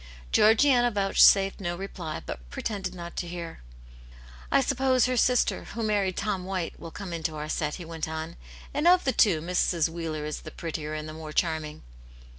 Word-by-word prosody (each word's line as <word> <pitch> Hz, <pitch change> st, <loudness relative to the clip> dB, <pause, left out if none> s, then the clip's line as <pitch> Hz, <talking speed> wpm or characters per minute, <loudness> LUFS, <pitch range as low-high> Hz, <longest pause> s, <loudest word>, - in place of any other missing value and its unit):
Georgiana 240 Hz, +3 st, +5 dB
vouchsafed 195 Hz, -2 st, +4 dB
no 175 Hz, -3 st, -2 dB
reply, 175 Hz, -4 st, -6 dB
but -, -, -7 dB
pretended 190 Hz, -, -4 dB
not 170 Hz, -1 st, -8 dB
to 175 Hz, -, -3 dB
hear. 170 Hz, -, -7 dB, 0.5 s
" -, -, -19 dB, 0.3 s
I -, -, +5 dB
suppose 265 Hz, -1 st, +2 dB
her 255 Hz, 0 st, 0 dB
sister, 250 Hz, +1 st, +2 dB
who 230 Hz, -, -5 dB
married 200 Hz, -4 st, 0 dB
Tom 200 Hz, -3 st, -1 dB
White, 185 Hz, -2 st, -4 dB
will 165 Hz, -, -8 dB
come 185 Hz, +1 st, -7 dB
into 160 Hz, -1 st, -3 dB
our 150 Hz, 0 st, -5 dB
set," 150 Hz, -1 st, -2 dB
he 175 Hz, -, -8 dB
went 160 Hz, -1 st, -4 dB
on. 160 Hz, +1 st, -5 dB, 0.2 s
" -, -, -17 dB
And 295 Hz, +4 st, +1 dB
of 360 Hz, +1 st, +6 dB
the 265 Hz, -, +2 dB
two, 180 Hz, -8 st, +4 dB
Mrs. 175 Hz, -2 st, +1 dB
Wheeler 160 Hz, -2 st, -4 dB
is 150 Hz, -, -4 dB
the 155 Hz, -, -8 dB
prettier 155 Hz, -1 st, -5 dB
and 155 Hz, 0 st, -5 dB
the 155 Hz, -, -7 dB
more 155 Hz, -1 st, -8 dB
charming." 155 Hz, -3 st, -1 dB
175 Hz, 195 wpm, -27 LUFS, 160-210 Hz, 0.5 s, of